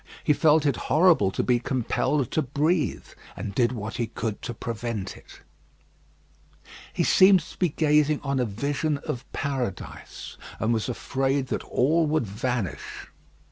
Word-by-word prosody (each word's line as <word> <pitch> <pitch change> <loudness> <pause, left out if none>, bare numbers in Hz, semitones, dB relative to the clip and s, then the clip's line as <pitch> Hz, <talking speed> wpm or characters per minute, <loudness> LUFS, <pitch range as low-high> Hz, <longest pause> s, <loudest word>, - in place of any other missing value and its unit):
He 150 - +4
felt 155 0 +4
it 140 -4 +2
horrible 160 - +5
to - - -2
be 125 -1 +2
compelled 130 +2 -1
to 155 - +1
breathe, 150 +4 0 0.3
and 100 - -5
did 120 +2 +2
what 110 -2 -5
he 120 - -1
could 110 -1 -4
to 125 - -4
prevent 115 -3 -4
it. - - -16 1.5
He - - 0
seemed 190 -1 +6
to - - -13
be 180 - +2
gazing 150 0 +2
on 140 -1 -1
a 125 - +2
vision 140 +8 -1
of 120 - -5
paradise, 130 -9 -5 0.2
and 110 +2 +1
was 110 +2 -1
afraid 135 +2 -1
that - - -2
all 160 +5 +2
would 155 -4 +1
vanish. 110 -1 -4
130 Hz, 150 wpm, -25 LUFS, 115-150 Hz, 1.5 s, seemed